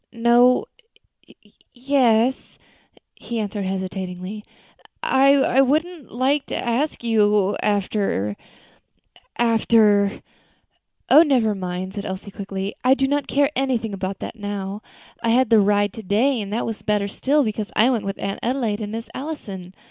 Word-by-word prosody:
"No 240 - +4 1.1
yes 250 -1 +1 0.3
" - - -31
he 235 - -6
answered 205 -1 -3
hesitatingly; 190 +1 -5 0.6
"I 270 -1 +4
wouldn't 310 +2 -1
like 270 +4 0
to - - -3
ask 245 +4 -2
you 210 -3 +2
after 195 - -1 1.0
after 220 -3 +3 0.4
" - - -40
"Oh! 305 - +9
never 255 -9 +2
mind," 185 -1 -5
said 200 0 -5
Elsie, 190 +2 -6
quickly; 195 0 -5
"I 255 +1 +5
do 270 0 0
not 285 0 -1
care 285 +1 +2
anything 245 -5 -1
about 195 0 -4
that - - -6
now. 205 -1 -5 0.4
I 230 - 0
had 245 0 +3
the 225 - +7
ride 205 0 +2
to 225 - -8
day, 225 +6 +1
and 200 -1 -6
that 225 - -1
was 225 -2 -5
better 210 -1 0
still, 280 +8 +1
because 215 -2 -3
I 235 +4 +4
went 230 -5 -1
with 195 0 -4
Aunt 195 0 -4
Adelaide 235 -4 -1
and 210 -1 -5
Miss 225 +1 -5
Allison. 200 - -7
220 Hz, 150 wpm, -22 LUFS, 200-255 Hz, 1.1 s, Oh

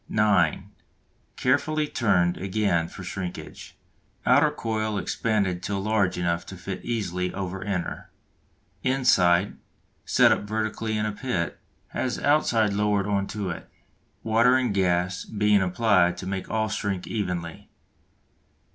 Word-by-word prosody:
(9) 100 -7 +2 0.6
Carefully 155 +4 +1
turned 95 -10 +2
again 95 -4 0
for 95 - -10
shrinkage. 90 0 -7 0.5
Outer 145 +5 +5
coil 110 -6 -2
expanded 100 -3 -1
till 100 0 -2
large 100 -2 +1
enough 85 -1 0
to 95 - -8
fit 95 +2 -6
easily 90 -6 -2
over 95 0 -4
inner. 95 -3 -4 0.7
Inside, 100 -9 +3 0.5
set - - +4
up - - +2
vertically 110 +1 -2
in 105 - 0
a 105 - -1
pit, 105 - -3 0.3
has 125 -2 -2
outside 115 -8 +2
lowered 105 -1 +1
on 100 -1 0
to 100 -3 -3
it, 85 - -8 0.5
water 115 +3 +4
and 130 -5 +1
gas 90 -1 +1
being 105 -1 +2
applied 90 -2 +2
to 95 - -7
make 95 0 -4
all 110 0 0
shrink 100 -3 -3
evenly. 90 -6 -4
100 Hz, 130 wpm, -25 LUFS, 90-110 Hz, 0.7 s, Outer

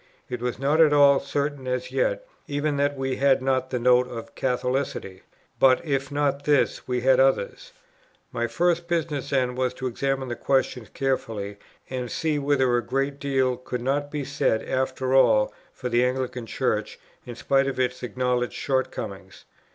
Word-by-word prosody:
It 125 -1 -4
was 125 -4 -2
not 145 +5 +2
at 155 -2 +6
all 140 -1 +6
certain 140 -1 -3
as 125 0 -2
yet, - - 0 0.2
even 145 0 -1
that 145 0 +1
we 135 -1 -2
had 135 -1 +4
not 130 -1 0
the 130 - -1
Note 125 +1 +4
of 115 -2 -8
Catholicity; 125 -7 -2 0.4
but, 130 -1 +6
if 135 -2 -1
not 145 -1 0
this, 145 -2 +1
we 125 -1 -1
had 130 +1 +4
others. 135 -6 +1 0.6
My 120 0 -1
first 170 +6 0
business 150 -5 -2
then, 130 -2 +1
was 125 0 -1
to 130 - -6
examine 135 +1 -1
this 120 - -5
question 130 -4 0
carefully, 110 -7 -2 0.3
and 125 -2 -4
see, 155 +1 -1
whether 135 -3 +2
a 120 - -1
great 135 +4 -2
deal 135 -3 +1
could 125 -1 -5
not 145 +2 0
be 145 -2 -4
said 135 -5 0
after 130 0 -1
all 115 -5 +4 0.2
for 125 - -6
the 120 0 +2
Anglican 125 -2 -2
Church, - - -1 0.3
in 120 - -7
spite 135 +3 +1
of 135 - -3
its 125 0 0
acknowledged 125 0 -1
short 130 +1 0
comings. 95 -3 -8
130 Hz, 175 wpm, -25 LUFS, 125-140 Hz, 0.6 s, at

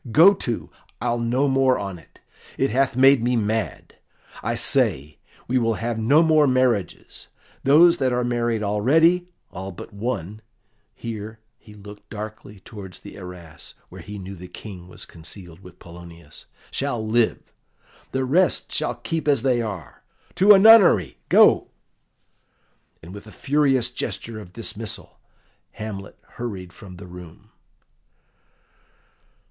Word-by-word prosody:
Go 170 - +7
to, 120 - -4 0.3
I'll 120 0 -1
no 125 +4 +1
more 135 -1 +3
on 100 -3 -6
it; 80 - -22 0.4
it 135 - +1
hath 130 +1 +1
made 135 -1 +6
me 125 +1 +1
mad. 110 0 -3 0.4
I - - -2
say, 75 +3 0 0.3
we 130 +1 +1
will 115 -1 +1
have 115 +1 -3
no 140 +9 +4
more 155 -2 +4
marriages; 125 -7 -1 0.4
those 165 +5 +6
that 130 -2 0
are 125 0 0
married 120 -2 -1
already 160 - +3 0.2
all 95 +2 -7
but 95 +4 -11
one" 105 -2 -4 0.5
here 110 -1 -7 0.2
he 105 -4 -16
looked 105 0 -13
darkly 105 -2 -9
towards 95 -3 -11
the - - -11
arras, 90 -5 -11
where - - -11
he 105 0 -9
knew 95 0 -8
the 90 -1 -10
King 90 -3 -10
was 90 - -10
concealed 85 +1 -12
with 90 -2 -15
Polonius 85 -3 -13 0.2
"shall 120 -6 -2
live; 115 +1 0 0.6
the 130 0 -1
rest 175 +8 +1
shall 120 - -1
keep 155 +7 -4
as 140 -5 +2
they 125 -3 +2
are. 100 -7 -7 0.3
To 200 +3 +7
a - - +7
nunnery, 195 - +6
go!" - - +5 1.4
And 85 +3 -11
with 100 +1 -11
a - - -11
furious 135 -3 +1
gesture 115 -2 -5
of 90 -4 -12
dismissal 110 0 -7 0.5
Hamlet 100 -2 -8
hurried 95 -7 -7
from 95 -2 -12
the 90 - -11
room. 90 -2 -13
110 Hz, 140 wpm, -23 LUFS, 95-130 Hz, 1.4 s, Go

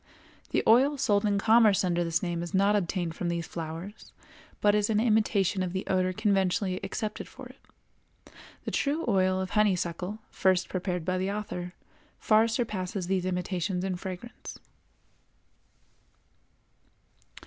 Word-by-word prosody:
] - - -28
The - - +1
oil 270 +6 +5
sold 210 -4 +2
in 200 -1 +1
commerce 220 -1 +5
under 175 -1 +1
this 165 +1 -1
name 170 -1 -2
is 175 +3 -4
not 200 +2 +4
obtained 175 -3 -1
from 175 +1 -3
these 170 -1 -2
flowers, 165 +6 -7 0.5
but 205 0 +4
is 210 0 +1
an 210 -1 +2
imitation 215 -4 +2
of 180 -1 -2
the 190 - -3
odor 185 -1 +1
conventionally 190 -2 0
accepted 210 +2 -4
for - - -11
it. - - -24 0.3
The - - -4
true 295 +4 0
oil 185 -3 +2
of 190 -1 -3
honeysuckle, 185 -2 0
first 185 -1 +1
prepared 180 -2 -3
by 185 0 0
the 190 +2 -1
author, 180 -4 -5 0.4
far 220 +1 +4
surpasses 205 -5 -2
these 185 0 0
imitations 180 0 -2
in 190 -1 -1
fragrance. 190 +5 -8
190 Hz, 145 wpm, -28 LUFS, 180-210 Hz, 0.5 s, oil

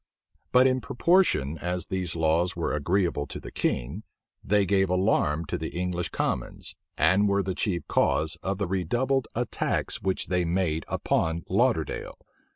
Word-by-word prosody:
But 125 +1 +6
in 130 -1 +2
proportion 120 - +2
as 90 0 -2
these 95 -3 -3
laws 80 +2 +1
were 85 - -2
agreeable 85 0 0
to - - -7
the - - -9
king, 70 - -2 0.4
they 100 0 +2
gave 95 -1 +2
alarm 90 -4 +1
to - - -3
the - - -5
English 90 -1 -2
commons, - - -3 0.2
and 100 +2 +4
were 100 0 +2
the 95 0 -2
chief 90 -4 -2
cause 80 +2 +1
of 95 0 -2
the 100 - -1
redoubled 120 +8 0
attacks 120 0 -1
which 95 -1 -1
they 90 -1 0
made 85 -2 0
upon 80 0 0
Lauderdale. - - 0
90 Hz, 155 wpm, -27 LUFS, 85-100 Hz, 0.4 s, But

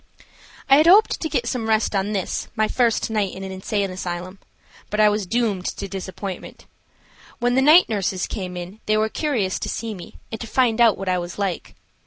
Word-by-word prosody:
I 275 0 +7
had 310 +2 +4
hoped 405 +5 +6
to 320 - -2
get 240 - -1
some 230 -2 -2
rest 220 -1 +1
on 195 +2 0
this 195 -3 -2
my 215 -1 +2
first 235 -2 +1
night 205 -4 -1
in 190 - -7
an 190 - -6
insane 195 +1 -2
asylum. 185 +1 -5 0.5
But 210 - -2
I 210 0 +6
was 205 -2 -1
doomed 215 -4 0
to 200 - -4
disappointment. 190 0 -7 0.7
When 245 0 +1
the 265 - +3
night 310 +6 +7
nurses 195 -4 -1
came 180 -3 -5
in 180 +4 -8
they 215 0 +3
were 215 0 +1
curious 225 -10 -1
to - - -4
see 225 -1 -4
me 180 -4 -11 0.2
and 220 - -6
to 230 - -5
find 240 -1 +2
out 230 -3 +5
what 195 - -6
I 180 -1 +1
was 175 0 -6
like. 195 -4 -3
210 Hz, 210 wpm, -22 LUFS, 190-230 Hz, 0.7 s, I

